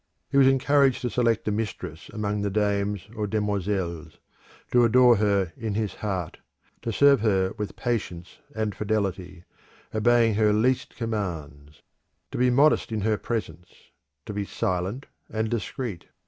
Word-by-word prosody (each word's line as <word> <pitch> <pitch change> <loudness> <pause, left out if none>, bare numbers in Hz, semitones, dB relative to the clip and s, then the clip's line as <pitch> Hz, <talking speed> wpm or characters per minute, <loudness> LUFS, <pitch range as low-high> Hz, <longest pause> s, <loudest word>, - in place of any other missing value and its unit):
He - - +2
was 135 - +7
encouraged 135 0 +3
to 125 - -1
select 115 -3 +1
a - - +2
mistress 110 +1 -5
among 105 -1 -2
the 100 - 0
dames 100 -1 -1
or 105 -1 -2
demoiselles; 95 -6 -2 0.5
to 120 -1 +5
adore 120 0 +6
her 100 -4 +1
in 110 -3 -4
his 105 -2 -1
heart, 95 -6 -4 0.4
to 115 - -3
serve 140 +2 +5
her 95 -3 +1
with 105 - -4
patience 95 -8 -4 0.2
and 110 -2 -1
fidelity, 95 -5 -2 0.5
obeying 115 +1 +3
her 105 0 +3
least 125 +5 +1
commands; 80 - -5 0.5
to - - -4
be 125 0 +4
modest 140 0 +3
in 110 -2 -2
her 105 0 +1
presence; 105 -6 -5 0.5
to - - -6
be 100 0 -2
silent 95 +7 -2 0.2
and 110 0 -2
discreet. 115 -4 -4
105 Hz, 145 wpm, -25 LUFS, 95-115 Hz, 0.5 s, was